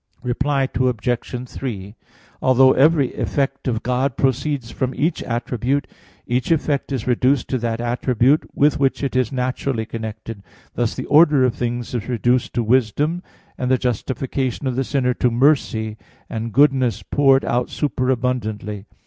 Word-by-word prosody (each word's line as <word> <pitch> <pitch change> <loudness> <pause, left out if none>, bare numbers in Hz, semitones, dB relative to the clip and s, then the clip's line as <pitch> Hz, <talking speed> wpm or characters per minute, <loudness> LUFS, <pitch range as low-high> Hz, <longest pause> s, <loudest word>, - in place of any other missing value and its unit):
Reply 135 +2 0
Obj. 125 0 -1
3: 105 -6 -6 0.5
Although 130 0 +5
every 145 -1 +3
effect 135 -1 -2
of 115 -3 -1
God 125 +1 0
proceeds 135 -2 -1
from 130 -1 -2
each 160 +4 0
attribute, 125 +3 -1 0.4
each 125 +1 -1
effect 145 -4 0
is 130 -5 -2
reduced 125 +1 +2
to 130 - 0
that 115 0 -2
attribute 125 +3 +1
with 145 0 +3
which 135 0 +1
it 135 - -2
is 130 -3 +1
naturally 130 -2 -2
connected; 110 -1 -7 0.3
thus 120 -2 -1
the - - -5
order 150 -2 +5
of 125 -2 +2
things 120 0 -3
is 120 -1 -3
reduced 120 +1 0
to 120 - +1
"wisdom," 130 - +1 0.4
and 125 - -1
the 130 - +4
justification 130 +2 -2
of 130 -2 -1
the 135 - 0
sinner 130 -2 0
to 125 - +1
"mercy" 115 -4 +1 0.3
and 115 +1 -4
"goodness" 130 -5 +3
poured 135 -2 +3
out 120 +1 0
super 130 -3 -1
abundantly. 110 -5 -2
125 Hz, 150 wpm, -21 LUFS, 120-135 Hz, 0.5 s, Although